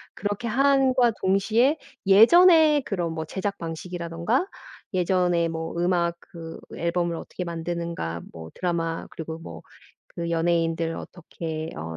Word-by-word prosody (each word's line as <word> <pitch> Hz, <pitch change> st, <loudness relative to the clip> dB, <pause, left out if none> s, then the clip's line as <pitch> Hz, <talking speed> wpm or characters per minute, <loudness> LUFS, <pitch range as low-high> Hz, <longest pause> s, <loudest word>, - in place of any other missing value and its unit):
그렇게 205 Hz, +4 st, -3 dB
함과 265 Hz, 0 st, +3 dB
동시에 220 Hz, +10 st, +3 dB, 0.3 s
예전에 310 Hz, -, +7 dB
그런 175 Hz, -8 st, -3 dB
뭐 160 Hz, 0 st, -4 dB
제작 200 Hz, +4 st, -4 dB
방식이라든가 170 Hz, -, -2 dB, 0.5 s
예전에 180 Hz, -2 st, +2 dB
뭐 165 Hz, 0 st, -4 dB
음악 175 Hz, -1 st, +1 dB
그 165 Hz, -1 st, -10 dB, 0.2 s
앨범을 170 Hz, 0 st, -1 dB
어떻게 180 Hz, -, -6 dB
만드는가 170 Hz, -, -4 dB
뭐 80 Hz, -1 st, -9 dB
드라마 165 Hz, -2 st, -2 dB
그리고 160 Hz, 0 st, -6 dB
뭐 165 Hz, -, -9 dB, 0.5 s
그 170 Hz, -1 st, -3 dB
연예인들 165 Hz, 0 st, 0 dB
어떻게 160 Hz, -2 st, -6 dB
어 80 Hz, +1 st, -6 dB
170 Hz, 280 characters per minute, -25 LUFS, 165-205 Hz, 0.5 s, 예전에